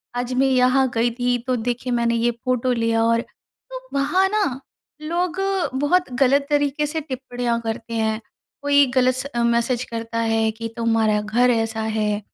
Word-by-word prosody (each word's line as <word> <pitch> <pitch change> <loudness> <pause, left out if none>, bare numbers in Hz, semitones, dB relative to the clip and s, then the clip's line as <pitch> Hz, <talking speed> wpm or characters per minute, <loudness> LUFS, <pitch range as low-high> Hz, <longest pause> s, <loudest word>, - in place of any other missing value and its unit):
आज 245 +1 -2
मैं 265 +2 +3
यहाँ 260 0 +3
गई 235 +1 +1
थी 245 +1 0
तो 255 - +1
देखिए 245 +2 -3
मैंने 235 -1 +1
ये 235 +1 +1
फ़ोटो 250 +1 -1
लिया 230 -1 +1
और 230 0 +2
तो - - -13
वहाँ 295 +8 +2
ना 390 -11 0 0.4
लोग 345 +3 -2 0.4
बहुत 355 +1 +2
गलत 275 +2 +4
तरीके 290 0 +1
से 315 +2 -3
टिप्पणियाँ 245 -4 -3
करते 230 0 -5
हैं। 220 -1 0 0.4
कोई 285 0 +4
गलत 255 0 +4
स 255 +1 -4
अ, 235 - +1
मैसेज 235 +1 +1
करता 230 -1 -5
है 225 -1 +1
कि, 225 +1 -6
"तुम्हारा 225 -2 +2
घर 235 +4 +2
ऐसा 225 -1 0
है", 215 -1 -1
245 Hz, 170 wpm, -22 LUFS, 230-270 Hz, 0.4 s, गलत